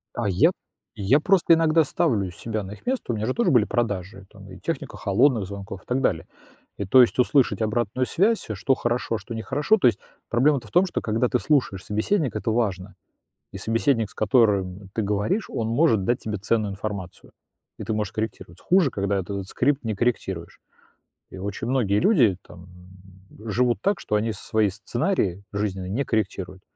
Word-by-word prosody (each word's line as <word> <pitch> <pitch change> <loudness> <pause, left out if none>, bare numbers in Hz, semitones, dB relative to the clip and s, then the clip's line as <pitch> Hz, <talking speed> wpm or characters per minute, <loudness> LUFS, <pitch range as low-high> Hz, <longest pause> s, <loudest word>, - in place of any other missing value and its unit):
А 115 - -1
я 90 - +4 0.5
я 110 +9 +3
просто 175 -1 +4
иногда 160 0 +3
ставлю 115 - 0
себя 105 +2 -4
на 95 - -8
их 105 - -12
место, 255 - -1
у - - -1
меня 105 - -2
же 130 - 0
тоже 235 - +1
были 120 -5 +4
продажи, 100 -4 -3
там 100 -2 -14
и 95 0 -11
техника - - -4
холодных 115 +2 +2
звонков, 100 -1 -8
и - - -31
так 130 +2 -1
далее. 85 -10 0 0.5
И 100 - -3
то 130 +7 +6
есть 125 - +2
услышать 125 -3 +3
обратную 120 +3 0
связь, 205 - +1
а 110 - -2
что 120 +7 +1
хорошо, 120 -2 -1
а - - -1
что 115 - -8
не 110 - -3
хорошо. 145 - +2
То 185 - +4
есть 115 -3 +2 0.3
проблема-то 130 0 +2
в - - -17
том, 180 +2 +4
что 185 - -3
когда 115 +3 0
ты 125 - +1
слушаешь 105 -5 0
собеседника, 120 - 0
это 110 - -1
важно, 100 -5 -2 0.6
И 95 - -7
собеседник, 115 +1 0
с - - -16
которым 100 -4 +1
ты 110 - 0
говоришь, 105 - -1
он 115 - -2
может 115 - +2
дать 120 +3 0
тебе 105 -1 -4
ценную 105 0 0
информацию, 100 -3 -7 0.5
и - - -6
ты 110 - -2
можешь 105 -3 -2
корректировать. 110 -4 -5
Хуже, 180 -6 +3
когда 100 -1 -1
этот 95 +1 -4
скрипт 140 +5 0
не 110 -1 -1
корректируешь. 95 -7 -2 0.7
И - - -9
очень 100 +4 -4
многие 110 -6 +1
люди 135 - +4
там 90 +1 -14 0.8
живут 120 +2 +1
так, 200 +1 +1
что 105 - -1
они 110 +2 0
свои 110 -1 0
сценарии 105 - -1
жизненные 95 -3 -3
не 135 +8 -1
корректируют. 95 -4 -3
110 Hz, 190 wpm, -24 LUFS, 100-130 Hz, 0.8 s, то